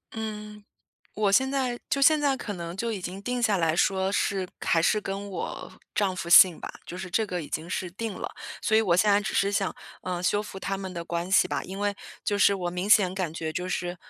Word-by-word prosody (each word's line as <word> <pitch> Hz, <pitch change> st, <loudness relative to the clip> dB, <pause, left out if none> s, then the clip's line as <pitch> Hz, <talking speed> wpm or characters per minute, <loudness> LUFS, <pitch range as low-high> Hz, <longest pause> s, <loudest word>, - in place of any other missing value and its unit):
嗯， 210 Hz, -1 st, -6 dB, 0.5 s
我 205 Hz, -1 st, +1 dB
现 265 Hz, +6 st, +3 dB
在 255 Hz, -3 st, -1 dB
就 275 Hz, -, +1 dB
现 310 Hz, +2 st, +6 dB
在 285 Hz, -2 st, +2 dB
可 215 Hz, -6 st, -5 dB
能 170 Hz, -1 st, -6 dB
就 230 Hz, +4 st, -2 dB
已 215 Hz, -, -3 dB
经 180 Hz, +2 st, -6 dB
定 245 Hz, +3 st, -2 dB
下 210 Hz, -4 st, +3 dB
来 165 Hz, -1 st, +1 dB
说 190 Hz, +1 st, +2 dB
是 195 Hz, -2 st, 0 dB, 0.2 s
还 165 Hz, -, +3 dB
是 210 Hz, +5 st, +3 dB
跟 200 Hz, 0 st, -5 dB
我 -, -, -5 dB, 0.2 s
丈 195 Hz, -3 st, +1 dB
夫 170 Hz, -1 st, -5 dB
姓 175 Hz, -1 st, +8 dB
吧， -, -, -7 dB
就 175 Hz, -, -7 dB
是 185 Hz, 0 st, -6 dB
这 220 Hz, +4 st, +1 dB
个 180 Hz, -4 st, -3 dB
已 -, -, -9 dB
经 160 Hz, +2 st, -4 dB
是 185 Hz, -1 st, -3 dB
定 215 Hz, +3 st, -5 dB
了。 -, -, -6 dB, 0.3 s
所 220 Hz, -, +1 dB
以 220 Hz, -, +6 dB
我 180 Hz, -6 st, +2 dB
现 205 Hz, +3 st, +4 dB
在 200 Hz, -, +4 dB
只 210 Hz, -, -4 dB
是 200 Hz, +1 st, +2 dB
想， 200 Hz, -2 st, 0 dB, 0.3 s
呃， 180 Hz, -1 st, -3 dB
修 205 Hz, +3 st, +1 dB
复 195 Hz, -, -8 dB
他 195 Hz, 0 st, -3 dB
们 190 Hz, -1 st, -6 dB
的 170 Hz, -1 st, -5 dB
关 170 Hz, +2 st, -3 dB
系 -, -, +5 dB
吧。 -, -, -2 dB
因 190 Hz, +1 st, -7 dB
为 205 Hz, 0 st, 0 dB, 0.3 s
就 205 Hz, -1 st, 0 dB
是 200 Hz, 0 st, +5 dB
我 180 Hz, -2 st, -3 dB
明 180 Hz, +3 st, -3 dB
显 195 Hz, -4 st, +5 dB
感 185 Hz, -5 st, -2 dB
觉 160 Hz, -1 st, -4 dB
就 180 Hz, +2 st, -3 dB
是， 175 Hz, 0 st, -3 dB
195 Hz, 265 characters per minute, -27 LUFS, 180-210 Hz, 0.5 s, 姓